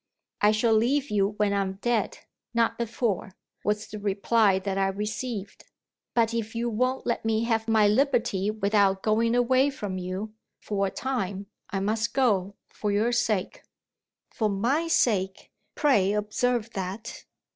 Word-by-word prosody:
"I 210 - +6
shall 220 +1 +2
leave 260 +5 +2
you 200 0 +1
when 210 -1 +2
I'm 195 -1 0
dead 225 +3 -1 0.4
not 230 0 +1
before," 225 -4 -2 0.3
was 210 0 0
the 215 - -8
reply 205 0 +2
that 190 0 -3
I 195 0 +2
received. 210 +1 -4 0.5
"But 230 -1 +2
if 230 0 -3
you 235 +1 -1
won't 255 +4 0
let 235 - -1
me 225 0 +1
have 225 -1 0
my 220 -2 +4
liberty 210 -4 +2
without 200 -2 +2
going 230 +2 +2
away 255 +3 +3
from 205 -9 -5
you, 185 +4 -5 0.3
for 200 -2 -1
a - - -2
time, 200 -6 -3 0.2
I 195 -2 -2
must 220 +3 -1
go 200 -7 +2 0.2
for 210 - -2
your 215 +4 +2
sake." 220 -5 0 0.7
(For 215 -2 0
my 245 +12 0
sake! 195 - +1 0.2
Pray 205 -10 +3
observe 225 +2 0
that.) 195 +3 -6
215 Hz, 150 wpm, -26 LUFS, 200-235 Hz, 0.7 s, I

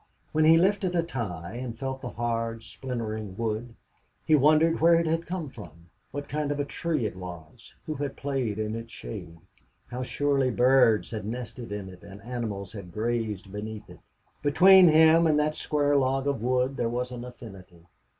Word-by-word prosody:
When 155 0 +3
he 165 +1 +7
lifted 190 0 +2
a 170 - +2
tie 105 - -5
and 120 -2 -5
felt 135 +1 -4
the 125 - -5
hard, 115 -1 -3
splintering 110 -2 -5
wood, 115 +1 -3 0.5
he 155 - +2
wondered 155 +3 +4
where 170 +1 +6
it 165 0 +2
had 165 +1 -1
come 180 -3 -3
from, 85 - -13 0.2
what 145 0 -6
kind 150 0 -2
of 145 - -2
a 145 - 0
tree 155 -4 -2
it 105 - -3
was, 85 -4 -10
who 155 - -3
had 145 -1 -4
played 135 -7 -2
in 110 0 -2
its 115 0 -7
shade, 90 -10 -8 0.5
how 125 +1 -4
surely 135 0 +1
birds 125 -2 +4
had 110 -3 -4
nested 120 +1 -6
in 105 -2 -5
it 90 -1 -12
and 100 0 -12
animals 110 -6 -5
had 100 -5 -9
grazed 110 -2 -2
beneath 105 -1 -7
it. 90 - -14 0.4
Between 180 +6 +7
him 160 +1 +6
and 155 -1 +3
that 150 +1 +1
square 145 -1 0
log 135 0 +1
of 140 -5 -1
wood 125 +2 0
there 115 - 0
was 125 +1 -3
an 120 -1 -6
affinity. 100 -8 -12
125 Hz, 185 wpm, -27 LUFS, 105-145 Hz, 0.5 s, he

